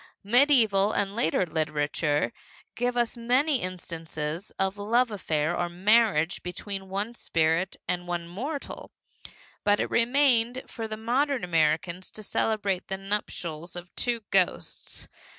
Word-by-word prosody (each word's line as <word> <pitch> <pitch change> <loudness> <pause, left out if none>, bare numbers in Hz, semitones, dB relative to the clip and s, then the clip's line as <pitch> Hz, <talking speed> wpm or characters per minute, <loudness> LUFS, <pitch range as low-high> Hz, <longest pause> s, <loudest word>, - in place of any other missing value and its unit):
Medieval 220 -4 +5
and 200 0 -1
later 185 -5 +2
literature 150 -4 0 0.4
gave 245 +1 -1
us 240 0 +1
many 255 +5 +2
instances 165 -1 -5
of 190 0 0
a 205 - -8
love 235 +3 +2
affair 160 -5 -1
or 175 0 -1
marriage 190 -2 +3
between 190 +2 -5
one 205 +5 -2
spirit 165 -3 +1
and 175 0 -1
one 175 -1 -3
mortal, 270 - -5 0.7
but 205 0 +3
it - - -1
remained 245 0 +3
for 225 -1 -6
the 215 0 -5
modern 255 +4 0
American 165 +1 +1
to 215 +3 -9
celebrate 205 -3 0
the 190 - -3
nuptials 180 -4 -4
of 175 +1 -9
two 240 -2 0
ghosts. 185 - -1
195 Hz, 135 wpm, -27 LUFS, 170-235 Hz, 0.7 s, Medieval